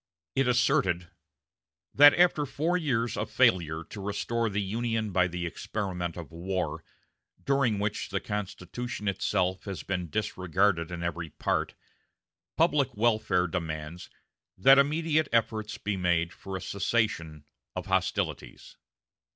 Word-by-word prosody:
It 135 -1 +2
asserted: 95 -8 +2 0.8
"That 145 +1 +8
after 170 -4 +3
four 160 +7 0
years 120 -9 0
of - - -3
failure 80 -3 +2
to 100 +5 -9
restore 115 +3 -1
the 105 0 -1
Union 110 +1 -1
by 90 -1 +3
the 90 0 -4
experiment 90 0 -4
of 85 -1 -8
war, 90 +2 -3 0.6
during 135 -6 +2
which... 105 +1 -2
the 100 -1 -1
Constitution 105 +3 -5
itself 95 -1 0
has 95 -8 -5
been 90 -3 -3
disregarded 95 -2 0
in 85 -1 -5
every 85 -1 -3
part," - - -1 0.8
public 145 -6 +2
welfare 110 -5 +2
demands 80 -1 -5 0.5
"that 135 +9 +7
immediate 155 +1 +2
efforts 110 -2 0
be 100 -1 -2
made 85 -2 +1
for 95 -1 -6
a - - -8
cessation 95 -7 -1 0.3
of - - -4
hostilities." - - -2
100 Hz, 125 wpm, -28 LUFS, 90-120 Hz, 0.8 s, That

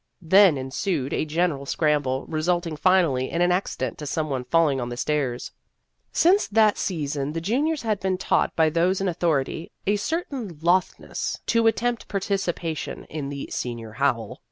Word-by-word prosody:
Then 190 -1 +6
ensued 135 +2 -2
a - - 0
general 155 -3 -1
scramble, 145 -4 0
resulting 165 +1 -1
finally 150 -6 +2
in 170 - -2
an 175 - +3
accident 180 - -2
to 150 - -5
some 155 +1 -2
one 130 -2 -2
falling 155 -5 +2
on 120 - -3
the 120 - -6
stairs. 130 -3 -1 0.6
Since 375 +5 +4
that 215 0 +4
sea 165 -6 -2
son 140 +1 -3
the 165 - -2
juniors 275 - 0
had 215 -3 0
been 190 -1 0
taught - - +1
by 160 -1 +3
those 175 +4 +2
in 195 - -1
authority 160 -3 -1
a 205 +1 +2
certain 260 - -3
lothness 180 +2 0
to 230 -1 +3
attempt 235 +1 0
participation 185 -5 -2
in 150 -3 -4
the 140 -1 -6
" - - -19
Senior 115 -3 -4
Howl." 115 -2 -1
165 Hz, 170 wpm, -24 LUFS, 140-190 Hz, 0.6 s, Then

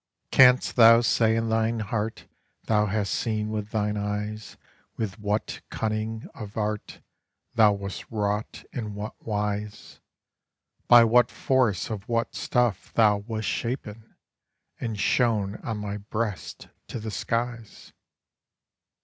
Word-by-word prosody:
Canst 130 -1 +5
thou 115 0 +8
say 110 -1 +3
in 115 0 0
thine 110 +1 +1
heart 110 +1 -3 0.4
Thou 105 -1 +2
hast 100 0 -1
seen 110 -2 -1
with 105 -1 -3
thine 105 -1 -1
eyes 105 +1 -4 0.4
With 110 -2 -4
what 105 +1 -2
cunning 110 0 -3
of 105 -1 -9
art 105 -1 -3 0.5
Thou 110 -3 +5
wast 100 -1 -6
wrought 105 -1 -2
in 105 -4 -4
what 105 +1 -5
wise, 105 -1 -4 0.9
By 120 -1 +9
what 120 +1 +4
force 125 -7 +1
of 105 0 -6
what 115 0 0
stuff 120 -6 0
thou 105 -3 +4
wast 110 +1 -4
shapen, 115 -3 -4 0.6
and 115 -4 -4
shown 105 -1 +1
on 110 -2 -5
my 105 -1 -4
breast 105 -3 -4 0.2
to - - -5
the 110 0 -5
skies? 115 +2 -4
110 Hz, 125 wpm, -26 LUFS, 105-115 Hz, 0.9 s, By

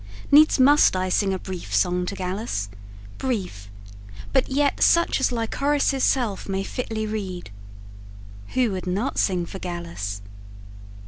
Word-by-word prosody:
needs 300 0 +6
must 285 -3 +6
I 185 0 -1
Sing 195 +1 +1
a 190 - -1
brief 180 - -6
song 180 - +1
to 200 - -4
Gallus 185 - -3 0.5
brief, 185 - -3 0.6
but 265 -2 +2
yet 280 +1 +1
Such 340 -4 +4
as 265 - +1
Lycoris' 275 +4 0
self 225 -7 0
may 195 0 -1
fitly 220 -1 -4
read. 190 - -5 1.0
Who 250 -4 +2
would 185 -1 -5
not 200 +9 -1
sing 180 -3 +1
for 190 - -8
Gallus? 170 - -5
195 Hz, 135 wpm, -24 LUFS, 180-255 Hz, 1.0 s, needs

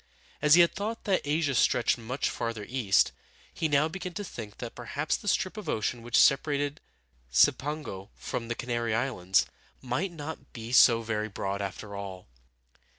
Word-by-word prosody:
As 150 +1 +7
he 175 0 +8
thought 210 +6 -4
that 195 -3 +1
Asia 145 -1 +1
stretched 120 -1 +3
much 125 +4 -2
farther 115 -3 -3
east, 120 -6 +3 0.4
he 160 - 0
now 145 0 +3
began 180 +2 -6
to 205 - -3
think 110 - -8
that 120 -2 -6
perhaps 135 +6 -2
the - - -8
strip 185 +1 +1
of 215 - -6
ocean 115 +2 -1
which 120 +1 0
separated 145 +1 +3 0.5
Cipango 100 - +1
from 115 - -5
the 120 - -2
Canary 120 -2 -1
Islands 105 -7 +1 0.3
might 130 +10 -2
not 160 -1 -8
be 115 0 -7
so 115 -2 +6
very 110 -1 -2
broad, 100 0 -3
after 100 +1 -6
all. 95 -2 -7
125 Hz, 160 wpm, -29 LUFS, 110-150 Hz, 0.5 s, he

